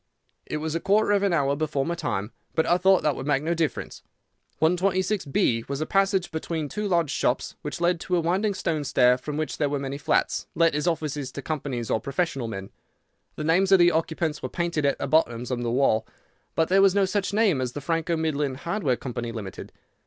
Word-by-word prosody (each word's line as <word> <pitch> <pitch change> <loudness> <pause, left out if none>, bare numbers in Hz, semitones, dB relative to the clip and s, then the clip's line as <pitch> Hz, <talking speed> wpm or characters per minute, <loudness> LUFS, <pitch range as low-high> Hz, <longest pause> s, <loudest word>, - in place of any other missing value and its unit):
"It - - -2
was 155 0 -3
a 165 - 0
quarter 205 +4 +2
of 200 -1 +3
an 200 -1 +2
hour 140 -4 +2
before 145 -2 -1
my 170 - -1
time, 120 - -3 0.2
but 160 - +2
I 175 +1 +3
thought 190 0 +4
that 150 -3 +2
would 135 - -6
make 145 -1 +1
no 165 +2 0
difference. 165 -2 -2 0.6
126B, 180 - +1
was 140 0 -2
a 155 - -1
passage 195 -1 +1
between 160 -1 -3
two 210 +5 -3
large 170 -6 +1
shops, 125 - -1
which 150 +3 -5
led 175 0 +2
to 180 - -1
a - - +3
winding 190 +5 0
stone 160 -5 -1
stair, 125 -2 +4
from 145 +4 -5
which 155 0 -3
there 145 -2 +2
were 145 - -1
many 140 0 -4
flats, - - 0
let 165 0 +3
as 150 +3 -1
offices 150 -5 -2
to 140 - -6
companies 135 -7 -3
or - - +2
professional 140 -3 -2
men. 95 -3 -6 0.6
The 155 - -4
names 180 +5 +3
of 195 - +8
the 175 -1 +5
occupants 160 -1 -1
were - - -4
painted 170 -4 -1
at 140 - +1
the - - -3
bottom 125 -5 +2
on 120 -1 -1
the 120 - -1
wall, 120 -3 +2 0.5
but 160 - +2
there 195 +1 +4
was 195 -1 +5
no 200 -1 +4
such 195 +1 -1
name 200 -9 +2
as 125 -1 -3
the - - -4
Franco 165 +2 -1
Midland 150 -4 -1
Hardware 170 - -1
Company, 120 -2 -5
Limited. 105 -5 -7
155 Hz, 220 wpm, -25 LUFS, 140-175 Hz, 0.6 s, of